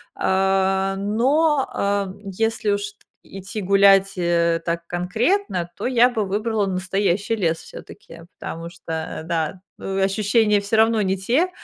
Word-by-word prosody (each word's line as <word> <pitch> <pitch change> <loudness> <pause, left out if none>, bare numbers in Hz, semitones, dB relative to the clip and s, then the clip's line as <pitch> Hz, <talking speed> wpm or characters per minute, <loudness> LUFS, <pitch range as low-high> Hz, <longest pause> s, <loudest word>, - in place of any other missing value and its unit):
А, 190 0 +1
но, 265 +9 +1
э, 200 -1 -1 0.3
если 225 -1 +1
уж 205 0 0
ид 205 -1 -9 0.4
идти 205 +2 -5
гулять, 195 0 +4
э, 170 -1 +1
так 170 0 -3
конкретно, 180 - -1
то 200 - -5
я 245 -1 +4
бы 220 -4 -2
выбрала 210 +2 -1
настоящий 195 +2 -1
лес 165 -6 0
все-таки. 175 -5 -12 0.2
Потому 165 +1 -6
что, 170 -1 -8 0.3
а, - - -8
да, 165 +2 -2 0.2
э, 195 0 -2
ощущения 210 +2 +2
всё 200 +2 -2
равно 225 0 +4
не 190 -1 0
те. 255 - +1
195 Hz, 145 wpm, -22 LUFS, 185-220 Hz, 0.4 s, гулять